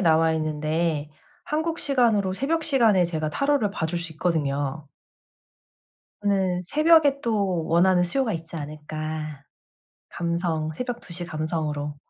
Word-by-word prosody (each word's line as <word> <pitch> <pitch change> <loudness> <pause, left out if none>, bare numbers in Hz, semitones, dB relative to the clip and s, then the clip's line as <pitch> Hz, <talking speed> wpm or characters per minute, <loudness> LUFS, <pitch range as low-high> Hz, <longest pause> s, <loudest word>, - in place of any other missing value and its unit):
나와있는데 160 -2 +1 0.3
한국 320 +2 -1
시간으로 230 -8 +2
새벽 315 +8 0
시간에 230 - +4
제가 160 -3 -2
타로를 280 - +1
봐 160 - -2
줄 170 +2 -2
수 170 -1 -4
있거든요. 145 -3 -1 1.4
저는 190 -3 +1
새벽에 300 - +4
또 200 -7 0
원하는 180 +2 +4
수요가 220 +6 0
있지 165 0 -6
않을까. 155 -1 -5 0.7
감성 170 -2 -2
새벽 245 +7 -4
2:00 180 - -13
시 175 +1 -3
감성으로. 155 -3 -3
170 Hz, 270 characters per minute, -25 LUFS, 155-215 Hz, 1.4 s, 시간에